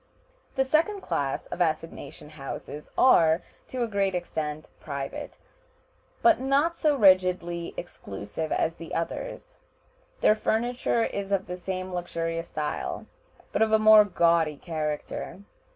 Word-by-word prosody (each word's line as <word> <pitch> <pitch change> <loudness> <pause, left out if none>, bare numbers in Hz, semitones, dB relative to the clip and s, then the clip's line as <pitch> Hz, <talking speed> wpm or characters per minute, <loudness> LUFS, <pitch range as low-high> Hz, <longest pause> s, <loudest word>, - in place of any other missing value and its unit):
The 265 -1 +2
second 330 +9 +1
class 140 - -2
of - - -5
assignation 155 -2 -3
houses 150 0 -7
are, 165 -9 +5 0.2
to 255 -2 -2
a - - -1
great 200 -3 0
extent, 155 -3 -4
private, 140 -2 -6 0.9
but 345 -5 +6
not 280 +6 +2
so 305 -3 +2
rigidly 180 -5 +3
exclusive 105 - -6
as 165 - +1
the 165 - -7
others. - - -4 0.6
Their - - +6
furniture 235 +2 0
is 200 -2 -3
of 195 -1 +1
the 180 - -5
same 185 0 -5
luxurious 165 -1 -3
style, 150 -1 -3 0.5
but - - -1
of 220 0 +4
a 220 - +6
more 215 0 +8
gaudy 170 -6 +2
character. 155 +3 -4
180 Hz, 130 wpm, -27 LUFS, 160-220 Hz, 0.9 s, more